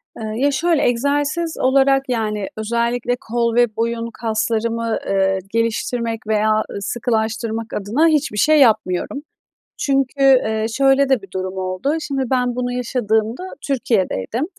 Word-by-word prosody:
Eee, 215 -1 -5
ya, 285 +3 +2
şöyle 320 +2 +1
egzersiz 290 +6 0
olarak, 270 +1 +3
yani, 210 -4 -1
özellikle 235 +2 -1
kol 235 -1 -1
ve 240 -3 +3
boyun 230 0 -2
kaslarımı, 230 0 -1
eee, 195 -1 +1
geliştirmek 230 0 -1
veya 215 0 +2 0.2
sıkılaştırmak 225 +1 -2
adına 225 +11 +1
hiçbir 300 -9 +1
şey 305 +6 +4
yapmıyorum. 220 0 +2 0.6
Çünkü, 275 0 0
eee, 220 -5 +4
şöyle 275 0 +3
de 265 -4 +2
bir 195 -2 -14
durum 185 0 -4
oldu. 185 +10 -1
Şimdi 275 -3 -2
ben 250 -1 +1
bunu 245 0 -2
yaşadığımda 235 - -1 0.2
Türkiye'deydim. 230 - 0
235 Hz, 130 wpm, -19 LUFS, 220-270 Hz, 0.6 s, şey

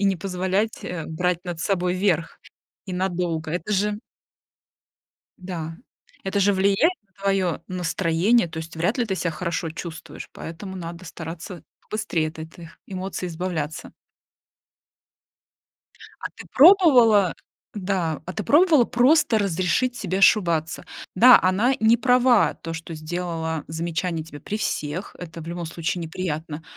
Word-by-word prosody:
и - - +1
не 195 -1 +3
позволять, 190 +4 -2
э, 170 -3 -4
брать 180 +2 -1
над 175 -2 -5
собой 180 -1 0
верх 180 -4 0 0.5
и 185 - -5
надолго. 175 -3 -2
Это 180 +4 -3
же 210 +1 0 1.4
да, 165 -3 -6 0.5
это 195 +1 0
же 200 +1 +4
влияет 200 - +3
на 195 - -41
твоё 190 -5 0
настроение. 180 +3 +1
То 160 - -7
есть 160 0 -7
вряд 180 +10 0
ли 245 - +2
ты 195 - -1
ся 180 -2 -1
хорошо 165 0 -3
чувствуешь, 165 0 -8
поэтому 190 +4 -8
надо 170 0 -7
стараться 165 +1 -8 0.3
быстрее 165 -7 -1
от 160 +1 -12
этих 165 +2 -10
эмоций 185 -1 -4
избавляться. 165 -3 -4 2.3
А - - -3
ты - - -10
пробовала? 255 - +6 0.4
Да, 185 -6 -2
а 180 - -5
ты 215 - -4
пробовала 305 - +5
просто 245 -1 +3
разрешить 195 +6 0
себе 190 -3 -2
ошибаться? 170 -5 +3 0.3
Да, 245 +6 +9
она 195 +8 +2
не 220 +2 +5
права, 250 -1 +4
то, 165 - -7
что 165 0 -7
сделала 160 0 -3
замечание 165 +1 -2
тебе 145 -2 -11
при 210 - -4
всех. 165 -4 -3
Это 165 -1 -8
в 160 - -9
любом 170 0 -4
случае 170 +2 -3
неприятно, 160 -2 -4
180 Hz, 140 wpm, -24 LUFS, 165-200 Hz, 2.3 s, Да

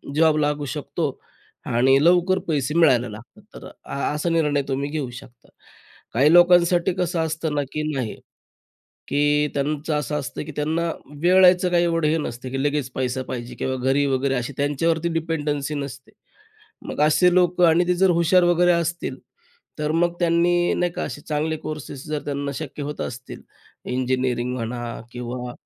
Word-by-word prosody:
Job 160 -1 +4
लागू 145 -1 0
शकतो 145 - -2 0.6
आणि 130 +3 +3
लवकर 180 +2 +4
पैसे 150 -3 -1
मिळायला 125 -8 +4
लागतात 115 - -12
तर - - -10
अ - - -10 0.2
असा 150 +3 -1
निर्णय 150 -4 +1
तुम्ही 140 +1 -2
घेऊ 150 -5 -3
शकता. 120 0 -14 0.6
काही 140 +6 +4
लोकांसाठी 175 0 +5
कसं 175 -1 0
असतं 160 -1 -2
ना 145 - +1
की 155 - -2
नाही, 125 -6 -3 1.0
की 145 +1 +2
त्यांचं 150 +2 -1
असं 150 0 -2
असतं, 135 - -6
की 155 - -8
त्यांना 160 +3 -1 0.3
वेळायचं 180 0 +5
काही 175 0 +3
एवढं 165 -2 +1
हे 160 +2 +1
नसते, 125 -3 -5
की 135 +1 -2
लगेच 145 -3 -1
पैसा 130 0 -2
पाहिजे 120 -1 -5
किंवा 130 0 -2
घरी 135 +3 +1
वगैरे 135 0 0
अशी 125 +2 -3
त्यांच्यावरती 160 +4 0
डिपेंडन्सी 150 -3 -2
नसते. 135 -2 -7 0.8
मग - - -3
असे 155 +4 +4
लोकं 180 -1 +4
आणि 170 +2 +3
ते 180 - +3
जर 190 +1 +3
हुशार 175 +2 +4
वगैरे 175 0 +4
असतील 170 -5 -1 0.6
तर 150 0 0
मग 170 +2 +1
त्यांनी 175 0 +2
नाही 175 -1 0
का - - -4
असे 145 - -6
चांगले 155 +1 -2
कोर्सेस 150 -3 -6
जर 150 -1 -2
त्यांना 140 0 -3
शक्य 145 -1 -6
होत 145 +1 -5
असतील 125 +1 -7 0.5
इंजिनिअरिंग 125 -1 -1
म्हणा 120 -1 -4
किंवा 125 0 -5
150 Hz, 160 wpm, -23 LUFS, 130-170 Hz, 1.0 s, लोकांसाठी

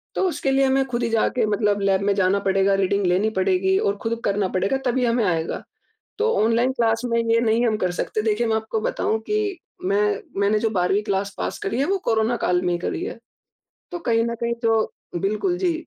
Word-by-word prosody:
तो 380 - +1
उसके 270 -5 -1
लिए 270 0 +3
हमें 270 0 +2
खुद 240 -1 -2
ही 230 - 0
जाके 225 +1 +1
मतलब 205 -1 +1
लैब 195 -1 +2
में 200 0 +2
जाना 200 0 +2
पड़ेगा, 195 +1 +3
रीडिंग 195 +1 +1
लेनी 190 +5 +2
पड़ेगी 190 0 +2
और 200 0 0
खुद 230 0 -2
करना 200 -1 +1
पड़ेगा 195 +9 0
तभी 250 0 +1
हमें 235 -1 +1
आएगा। 165 -3 -1 0.6
तो 455 +1 +2
ऑनलाइन 235 +3 +2
क्लास 225 -2 +1
में 235 -1 0
ये 230 0 +2
नहीं 230 +1 +2
हम 215 - +1
कर 185 -3 0
सकते, 180 +4 -2
देखिये 220 +2 0
मैं 220 - +2
आपको 220 0 -2
बताऊँ 220 +1 -1
कि 420 -3 0 0.3
मैं 205 +1 +1 0.2
मैंने 205 +2 +3
जो 225 - 0
12वीं 190 +1 +1
क्लास 200 -1 -2
पास - - -3
करी 210 +4 -3
है 280 - +2
वो 390 +5 +1
कोरोना 225 +1 +1
काल 180 -3 +1
में 180 - +1
ही - - 0
करी - - -3
है। - - -6 0.7
तो 350 - -4
कहीं 230 -7 +1
न 235 - -2
कहीं 235 0 -2
तो 225 -1 +1 0.3
बिल्कुल 215 - 0
जी, 355 -3 +1
220 Hz, 220 wpm, -22 LUFS, 195-235 Hz, 0.7 s, लिए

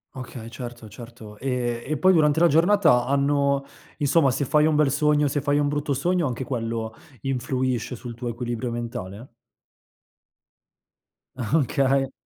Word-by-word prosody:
Okay, 120 -3 -8
certo, 120 -2 -9
certo. 110 -1 -12
Ehm, 120 -2 -2
e 155 - -2
poi 185 +4 +5
durante 155 -2 +3
la 170 - +7
giornata 165 -6 +4
hanno, 140 0 +1 0.4
insomma, 145 0 +3
se 140 - -1
fai 150 +3 +3
un 155 -1 +2
bel 150 -3 +3
sogno, 150 0 +2
se 145 - -1
fai 145 +1 +1
un 145 -1 +1
brutto 145 0 -1
sogno, 175 +4 0
anche 125 +1 -4
quello 115 -3 -3 0.3
influisce 130 -2 -2
sul 120 0 -8
tuo 120 +1 -6
equilibrio 120 0 -3
mentale? 115 -1 -6 2.1
Okay. 135 +1 +1
130 Hz, 140 wpm, -24 LUFS, 120-145 Hz, 2.1 s, la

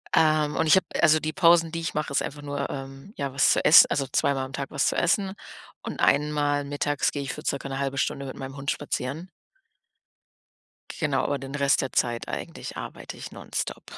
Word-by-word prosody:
Ähm, 155 -2 +3
und 160 - +1
ich 155 - +7
habe 190 - +2 0.2
also, 155 -1 +5
die 155 0 -3
Pausen, 170 -2 +4
die 165 0 -4
ich 165 - -3
mache, 150 -1 -2
ist 140 - +1
einfach 145 +1 -6
nur, 145 -1 -4
ähm, 135 +7 -8
ja, 140 -1 -3
was 140 - +4
zu - - 0
ess 155 - +9
also, 140 -2 -1
zweimal 135 0 +1
am 135 - -11
Tag 135 0 -5
was 140 - +1
zu - - 0
essen. 190 +2 +1 0.5
Und - - -6
einmal 145 0 +2
mittags 145 0 -1
gehe 145 - -4
ich 135 -1 -4
für - - -8
ca. 140 0 -2
'ne 135 0 -4
1/2 140 -1 -2
Stunde 140 0 -1
mit 130 - -7
meinem 135 +1 -7
Hund 140 0 -1
spazieren. 145 +3 -4 1.7
Genau, 145 -5 0
aber 145 - 0
den 135 0 -8
Rest 140 -1 +2
der 135 - -4
Zeit 120 -1 0
eigentlich - - -6
arbeite - - -8
ich - - -9
nonstop. - - -5
145 Hz, 210 wpm, -26 LUFS, 135-155 Hz, 1.7 s, ess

